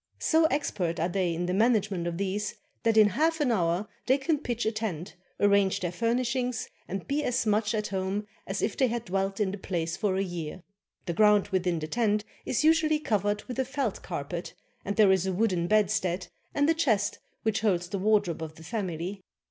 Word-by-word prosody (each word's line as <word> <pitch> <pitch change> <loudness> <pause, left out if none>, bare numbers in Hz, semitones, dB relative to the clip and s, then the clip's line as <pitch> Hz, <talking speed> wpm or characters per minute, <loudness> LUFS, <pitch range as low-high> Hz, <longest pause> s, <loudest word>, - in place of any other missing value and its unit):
So 320 0 +3
expert 210 - 0
are 165 - +1
they 180 -1 0
in 175 +2 -2
the 180 - -1
management 205 -4 +2
of 170 -1 -3
these 200 +2 -2 0.3
that 225 -1 +2
in 215 -1 +7
half 320 - +1
an 285 -5 +2
hour 180 -1 +1 0.2
they 260 - +5
can 300 +2 0
pitch 240 -5 -2
a 220 - +2
tent, 210 -6 -4 0.2
arrange 200 -1 +3
their 175 -2 -2
furnishings, 240 +3 -1 0.2
and 195 0 -5
be 295 +2 0
as 245 -3 0
much 215 +1 +1
at 210 -1 -2
home 195 +2 -2 0.2
as 195 +1 -2
if 215 - 0
they 260 - +3
had 235 -1 -3
dwelt 195 +2 -1
in 200 -3 +1
the 200 - -6
place 170 -3 -2
for 200 -3 0
a 195 - +1
year. 175 -2 -5 0.4
The 170 - -2
ground 210 +1 +4
within 180 -3 0
the 155 - -3
tent 210 +1 +1 0.2
is 260 - +1
usually 315 -1 +4
covered 205 -6 0
with 250 0 -6
a - - +3
felt 265 -5 -2
carpet, 170 0 -5 0.3
and 200 - -3
there 210 -3 +6
is 190 0 +2
a 190 - 0
wooden 180 -4 +1
bedstead, 185 -3 +1 0.3
and 285 0 +3
a 325 - +5
chest 220 -11 +1 0.2
which 220 -1 +1
holds 180 -5 +1
the 195 +2 -3
wardrobe 205 -5 +2
of 155 -1 -6
the 160 - -13
family. 185 -1 -4
205 Hz, 205 wpm, -28 LUFS, 180-230 Hz, 0.4 s, in